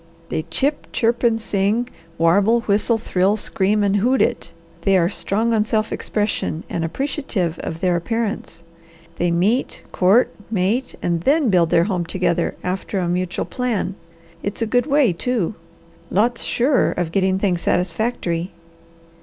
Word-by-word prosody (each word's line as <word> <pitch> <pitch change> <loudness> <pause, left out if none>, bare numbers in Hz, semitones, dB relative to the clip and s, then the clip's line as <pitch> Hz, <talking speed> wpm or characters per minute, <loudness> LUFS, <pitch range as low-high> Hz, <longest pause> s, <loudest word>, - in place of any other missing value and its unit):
They 155 - -2
chip, 285 - 0
chirp, 235 0 +1
and 230 -2 +2
sing, 215 +3 0 0.3
warble, 200 +8 +3
whistle, 215 +2 +2
thrill, 195 -1 +1
scream, 205 0 +1
and 200 0 +2
hoot 250 +6 +2
it. - - 0 0.3
They 195 -1 +3
are 170 -1 +2
strong 205 +6 -1
on 215 -2 +3
self 215 0 -1
expression, 205 -6 -2
and 165 - -2
appreciative 185 - -2
of 165 +1 -5
their 180 -2 +2
appearance. 205 -3 -3 0.5
They 175 - +1
meet, 195 +9 0
court, 195 +7 +3 0.2
mate, 220 +5 0
and 170 -1 0
THEN 280 - +3
build 170 -3 +3
their 165 - +4
home 180 -3 -1
together 180 -2 0
after 185 +2 -3
a 180 -2 0
mutual 180 +1 -1
plan. 245 -6 -2 0.5
It's 205 +3 -3
a - - +1
good 245 +4 +1
way, 280 - +3
too! 220 +1 -1 0.6
Lots 230 +4 +1
surer 260 +3 +2
of 175 -2 -2
getting 190 +1 +2
things 185 -3 0
satisfactory." 180 -1 -1
200 Hz, 150 wpm, -21 LUFS, 175-230 Hz, 0.6 s, their